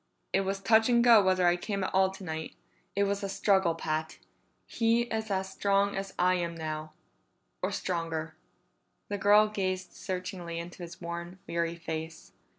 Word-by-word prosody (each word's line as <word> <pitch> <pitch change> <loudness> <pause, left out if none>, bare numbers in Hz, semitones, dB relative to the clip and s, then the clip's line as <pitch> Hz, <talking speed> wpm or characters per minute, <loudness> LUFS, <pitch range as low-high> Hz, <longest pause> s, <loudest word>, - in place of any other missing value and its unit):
"It 195 - +4
was 195 0 -2
touch 220 +3 +4
and 235 -1 +4
go 235 -3 +8
whether 185 -1 +3
I 175 0 +5
came 195 +2 -3
at - - -3
all 190 0 +4
tonight. 160 -5 -6 0.4
It 200 - +3
was 200 0 0
a 200 - -3
struggle, 190 -4 +2
Pat; 160 -1 -3 0.5
he 230 0 +2
is 220 -2 -3
as 190 -1 -1
strong 200 +1 +1
as 195 0 -5
I 180 +1 +4
am 170 -1 -2
now. 155 -1 -5 0.7
Or - - 0
stronger." 165 -2 -3 0.8
The 205 -1 -2
girl 205 +2 +6
gazed 185 -3 -3
searchingly 180 -2 -5
into 175 +2 -7
his 170 0 -9
worn, 170 +1 -6
weary 170 0 -1
face. 160 -1 -6
185 Hz, 165 wpm, -30 LUFS, 170-200 Hz, 0.8 s, go